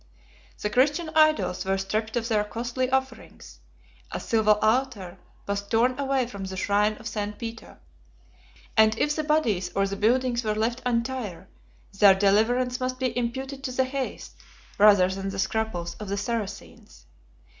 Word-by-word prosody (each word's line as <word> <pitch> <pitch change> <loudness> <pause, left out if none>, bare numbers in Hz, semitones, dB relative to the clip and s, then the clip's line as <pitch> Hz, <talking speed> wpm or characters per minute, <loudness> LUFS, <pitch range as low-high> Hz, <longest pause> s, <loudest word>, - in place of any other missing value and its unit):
The 210 - -2
Christian 295 +7 +2
idols 310 -11 +3
were 195 0 0
stripped 215 +3 -2
of 235 -1 -1
their 215 -3 +1
costly 240 +4 -3
offerings; 265 0 -4 0.5
a - - -4
silver 215 -2 +2
altar 215 -6 0 0.3
was 200 0 -1
torn 245 +5 +1
away 270 -2 +1
from 200 -5 -7
the 190 0 -6
shrine 205 +2 +2
of 225 - -8
St. 210 -1 -4
Peter; 230 -1 -8 1.0
and 220 0 +4
if 295 +4 +1
the 310 - -1
bodies 230 - +1
or 195 - +2
the 195 0 -3
buildings 240 +3 +1
were 215 -1 -1
left 235 +3 -1
entire, 235 -6 -3 0.5
their 200 -2 +8
deliverance 225 +6 +2
must 255 0 -2
be 255 -1 -2
imputed 265 +3 -3
to 255 - -2
the 260 +1 +1
haste, 265 0 -5 0.4
rather 200 -3 +7
than 195 +1 -4
the 195 - -6
scruples, 190 -5 -2
of 210 -2 -7
the 200 - -2
Saracens. 205 -1 -6
225 Hz, 155 wpm, -26 LUFS, 200-255 Hz, 1.0 s, their